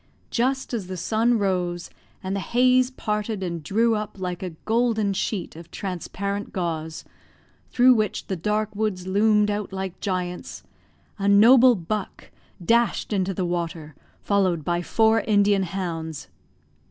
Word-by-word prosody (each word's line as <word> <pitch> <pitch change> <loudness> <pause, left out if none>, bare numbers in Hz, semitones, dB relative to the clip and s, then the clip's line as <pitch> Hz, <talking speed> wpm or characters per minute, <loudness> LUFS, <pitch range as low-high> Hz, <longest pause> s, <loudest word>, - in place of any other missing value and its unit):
Just 260 +2 0
as 210 -6 -3
the 185 0 -5
sun 230 +6 +1
rose, 180 -3 -1 0.3
and 190 +1 -2
the - - -1
haze 250 +5 +3
parted 210 -4 -3
and 170 -2 -4
drew 225 +9 +2
up 210 -2 -4
like 180 -1 -4
a 185 - -3 0.2
golden 220 -3 +1
sheet 190 -3 -3
of 165 +1 -11
transparent 200 +2 -4
gauze, 160 -3 -4 0.6
through 255 +1 +5
which 215 -4 -1
the 190 - -3
dark 210 +4 -1
woods 205 -4 -2
loomed 210 +2 +3
out 205 -1 -3
like 190 -1 -5
giants, 180 -2 -4 0.6
a 200 - -1
noble 240 +5 +7
buck 200 +3 -5 0.3
dashed 235 0 +2
into 195 -1 0
the 185 - -1
water, 170 -3 -4 0.3
followed 185 -6 +1
by 175 0 0
four 220 +4 +3
Indian 205 -2 +3
hounds. 170 -4 -4
200 Hz, 140 wpm, -24 LUFS, 180-220 Hz, 0.6 s, noble